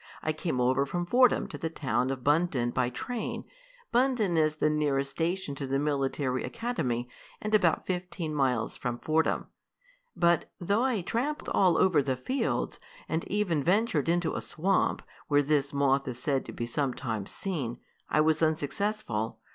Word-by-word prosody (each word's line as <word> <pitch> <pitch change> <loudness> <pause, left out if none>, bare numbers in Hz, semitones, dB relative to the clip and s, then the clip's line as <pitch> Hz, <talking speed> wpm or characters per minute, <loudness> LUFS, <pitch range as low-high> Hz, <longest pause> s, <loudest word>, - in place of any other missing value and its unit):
I 155 - 0
came 155 -4 -2
over 130 +2 +3
from 175 +4 -2
Fordham 250 +7 +4
to - - -7
the 160 - -2
town 130 -5 -1
of 135 -2 -4
Bundton 145 -5 +2
by 125 -1 +1
train. 230 - -4 0.5
Bundton 245 -7 +2
is 155 -1 +3
the 155 - +1
nearest 145 -3 +1
station 170 0 -1
to 140 0 -5
the 135 +1 +1
military 135 -2 0
academy, 180 - -2 0.3
and 215 0 -4
about 180 -6 +3
fifteen 180 -3 -3
miles 130 -6 0
from 120 -1 -3
Fordham. 155 +5 +1 0.7
"But 170 -2 +2
though 200 +6 +1
I 250 -7 +1
tramped 260 - -2
all 180 -4 +4
over 180 -6 +4
the 130 -2 -1
fields, 260 - -1 0.3
and 160 +1 -1
even 185 -8 0
ventured 180 - +2
into 175 -1 +1
a - - -3
swamp, 180 +3 0 0.2
where 145 -1 +4
this 145 -1 +1
moth 140 -1 +2
is 125 -2 -4
said 135 +1 -1
to - - -7
be 120 - -4
sometimes 120 -4 -2
seen, 145 -12 -3 0.3
I 150 - +3
was 155 0 +2
unsuccessful. 155 - -1
155 Hz, 165 wpm, -29 LUFS, 135-180 Hz, 0.7 s, Fordham